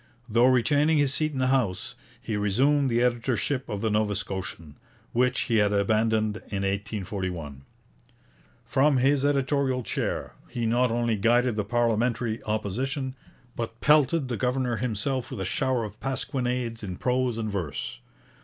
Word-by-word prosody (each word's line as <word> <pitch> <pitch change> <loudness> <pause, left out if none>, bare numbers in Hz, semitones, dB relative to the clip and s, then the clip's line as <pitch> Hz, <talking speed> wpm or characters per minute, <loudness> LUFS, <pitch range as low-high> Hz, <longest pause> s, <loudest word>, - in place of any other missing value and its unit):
Though 120 +2 +4
retaining 145 +5 +3
his 145 -2 +3
seat 155 +1 0
in 140 - -6
the 130 0 +1
House, 110 -9 0 0.3
he 110 - -4
resumed 130 +8 +2
the 120 0 +2
editorship 125 +2 0
of 100 -1 -3
the 110 -1 0
Nova 105 -1 +1
Scotian, 95 -6 -6 0.3
which 125 +1 +2
he 115 - +1
had 105 -1 +3
abandoned 110 +1 +1
in 100 -2 -5
1841. 95 -7 -3 1.0
From 140 +1 +3
his 135 +2 +3
editorial 140 -2 +1
chair - - -3 0.2
he 120 -1 -2
not 120 +2 +2
only 115 -1 0
guided 120 +3 +3
the 105 - 0
parliamentary 115 +1 0
Opposition, 130 +6 -2 0.4
but 115 0 -5
pelted 150 0 +4
the 120 -2 -3
governor 125 -2 0
himself 125 +2 -2
with 130 - -6
a 95 - -2
shower 130 +5 0
of 105 0 -8
pasquinades 125 -3 -2
in 95 -4 -5
prose 125 -2 0
and 110 -2 -2
verse. 90 -8 -4
120 Hz, 150 wpm, -26 LUFS, 105-130 Hz, 1.0 s, Though